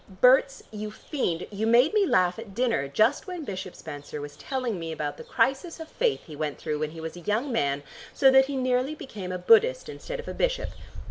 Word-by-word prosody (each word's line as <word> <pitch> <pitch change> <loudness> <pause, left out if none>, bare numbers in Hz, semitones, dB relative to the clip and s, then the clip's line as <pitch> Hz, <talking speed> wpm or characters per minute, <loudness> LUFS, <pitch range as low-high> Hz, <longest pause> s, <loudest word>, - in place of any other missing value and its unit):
Berts, 255 +7 +4
you 215 0 -5
fiend, 210 - -3
you 210 +2 -1
made 245 - +5
me 415 -3 +3
laugh 180 - +2
at 210 -4 -10
dinner 230 - +1
just 220 - +2
when 360 -3 -5
Bishop 190 -3 -6
Spenser 145 -1 -8
was 145 0 -7
telling 250 - -3
me 165 -1 -5
about 150 -2 -4
the - - -9
crisis 270 +8 0
of 320 -1 -8
faith 480 -3 0
he 155 - -10
went 150 -1 -3
through 150 -1 -3
when 155 0 -1
he 165 +1 -10
was 160 +1 -6
a - - -8
young 220 - -1
man 140 -9 0 0.3
so 270 -2 +5
that 265 0 +7
he 280 - -3
nearly 255 +3 +1
became 200 -11 -7
a 180 - -2
Buddhist 460 - +4
instead - - -6
of 475 - -8
a - - -4
bishop. - - 0
225 Hz, 220 wpm, -27 LUFS, 165-275 Hz, 0.3 s, that